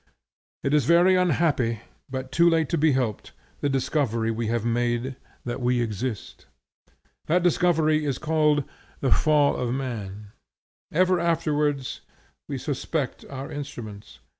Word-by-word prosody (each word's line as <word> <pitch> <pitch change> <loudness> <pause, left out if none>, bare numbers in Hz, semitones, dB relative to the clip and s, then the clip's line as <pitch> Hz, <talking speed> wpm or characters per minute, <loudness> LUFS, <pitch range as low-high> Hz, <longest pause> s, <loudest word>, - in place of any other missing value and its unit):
It 135 - 0
is 150 -5 +3
very 175 +5 +5
unhappy, 145 - +1 0.3
but 130 0 -5
too 170 +4 +5
late 160 -3 +2
to 170 - +1
be 155 -1 +4
helped, 125 -5 -2 0.3
the 145 - 0
discovery 130 -4 0
we 115 0 -2
have 115 0 -1
made 120 +2 0 0.3
that 120 +1 -4
we 125 0 +2
exist. 115 0 -4 0.8
That 170 +3 +2
discovery 160 -3 +3
is 140 -4 -1
called 150 -2 +2 0.4
the 135 - +1
Fall 150 -2 +4
of 125 -1 -2
Man. 105 -6 -5 0.6
Ever 185 +2 +3
afterwards 150 -5 0 0.5
we - - -2
suspect - - -3
our 135 0 -6
instruments. 110 -8 -8
135 Hz, 135 wpm, -25 LUFS, 120-155 Hz, 0.8 s, very